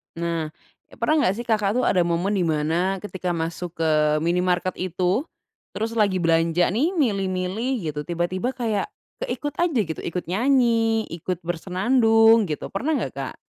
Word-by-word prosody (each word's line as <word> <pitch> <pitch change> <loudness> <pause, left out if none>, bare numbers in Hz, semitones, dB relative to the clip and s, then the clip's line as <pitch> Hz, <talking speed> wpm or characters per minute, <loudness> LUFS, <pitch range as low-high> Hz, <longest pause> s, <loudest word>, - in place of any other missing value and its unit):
Nah, 165 -1 -2 0.4
e - - -17
pernah 310 -1 +2
nggak, 185 - +1
sih, 240 - -5
Kakak, 215 -2 +1
tuh, 250 - +1
ada 185 - +2
momen 175 +4 0
di 175 - +1
mana 165 +5 0
ketika 185 -3 -3
masuk 165 +1 -4
ke 160 - +2 0.3
minimarket 180 +2 +1
itu, 185 - 0 0.5
terus 225 +1 -2
lagi 200 -5 +1
belanja, 165 +1 +2
nih, 305 - 0
milih-milih, 195 - -1
gitu, 150 - -6
tiba-tiba 180 +8 -2
kayak 225 -5 -1 0.3
keikut 300 -13 -4
aja, 340 -7 +2
gitu, 160 -3 -6
ikut 180 +1 -4
nyanyi, 230 -1 +2
ikut 175 +1 -4
bersenandung, 225 +5 +3
gitu, 150 -2 -5
pernah 280 +11 -1
nggak, - - -2
Kak? - - -6
190 Hz, 155 wpm, -23 LUFS, 175-230 Hz, 0.5 s, bersenandung